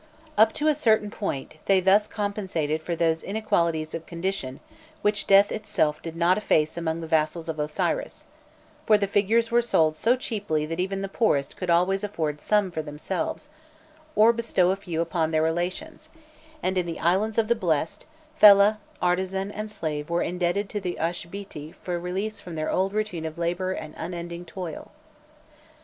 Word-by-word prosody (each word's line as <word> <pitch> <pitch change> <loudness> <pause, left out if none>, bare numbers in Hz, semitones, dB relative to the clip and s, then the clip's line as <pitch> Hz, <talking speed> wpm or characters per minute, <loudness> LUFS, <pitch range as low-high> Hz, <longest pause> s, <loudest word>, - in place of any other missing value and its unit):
Up 220 -2 +6
to 305 0 -1
a 305 - +5
certain 220 -7 +2
point 155 -9 -4
they 195 -1 +5
thus 195 +3 +4
compensated 185 -7 -2
for 170 +1 -3
those 165 -1 +1
inequalities 170 -7 0
of 165 0 -6
condition 170 -6 -3 0.4
which 210 -1 +1
death 200 +1 +6
itself 205 -8 0
did 165 -1 -7
not 175 +4 +3
efface 155 -7 +1
among 165 -1 -2
the 165 - -6
vassals 160 +1 0
of 160 -1 -4
Osiris; 150 0 -2 0.6
for 215 - +6
the 205 - 0
figures 215 +4 +2
were 240 0 +4
sold 160 -9 +2
so 230 +9 +3
cheaply 205 -11 -2
that 165 +2 -5
even 195 +1 -1
the - - -2
poorest 150 - 0
could 185 - -5
always 180 +3 +2
afford 155 -7 -3
some 210 -3 +2
for 160 - -3
themselves, 160 - -4 0.7
or 225 +2 +6
bestow 225 -6 +2
a - - +1
few 175 -4 -3
upon 165 -1 0
their 155 -1 +1
relations; 180 - -3 0.5
and 185 0 +1
in 175 - -2
the 165 - -5
Islands 195 +6 +1
of 225 -1 +3
the 235 - +4
Blest, 165 -7 -1 0.3
fellah, 210 -3 +7 0.2
artisan, 190 +2 0
and 215 +1 -5
slave 155 -7 -4
were 170 0 +1
indebted 180 +3 -1
to 205 - -3
the 180 -2 -3
Uashbîti 170 -1 -5
for 175 -1 -4
release 190 +5 -3
from 175 -2 -8
their 155 0 -2
old 190 +1 +1
routine 210 -6 -2
of 160 +1 -8
labour 175 +2 -1
and 155 -4 -6
unending 170 0 -5
toil. 170 -1 -7
180 Hz, 175 wpm, -25 LUFS, 165-205 Hz, 0.7 s, fellah